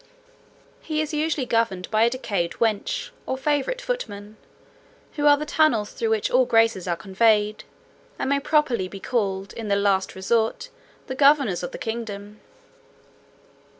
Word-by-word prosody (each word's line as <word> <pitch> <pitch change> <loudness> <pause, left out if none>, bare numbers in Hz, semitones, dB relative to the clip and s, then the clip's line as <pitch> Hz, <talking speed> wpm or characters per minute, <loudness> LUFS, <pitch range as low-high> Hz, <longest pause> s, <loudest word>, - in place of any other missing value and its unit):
"He 310 -1 -3
is 310 0 -2
usually 300 -3 0
governed 230 -6 0
by 215 0 +2
a 230 - +5
decayed 200 -9 -2
wench, 220 -3 -1 0.2
or 260 - -2
favourite 295 - 0
footman, 215 - -5 0.8
who 295 -1 +1
are 290 0 +7
the 300 - -4
tunnels 290 -9 +2
through 225 - -2
which 220 -2 0
all 255 0 +4
graces 225 -5 +2
are 175 - 0
conveyed, 210 +3 +1 0.5
and - - -2
may 280 - +3
properly 275 -10 +1
be 195 +1 -9
called, 195 -4 -2
in 225 -2 -6
the 200 - +2
last 200 -1 +1
resort, 225 - 0 0.4
the 260 - -5
governors 275 -8 +3
of 175 - -4
the - - -7
kingdom." 215 -2 -6
225 Hz, 150 wpm, -24 LUFS, 200-280 Hz, 0.8 s, are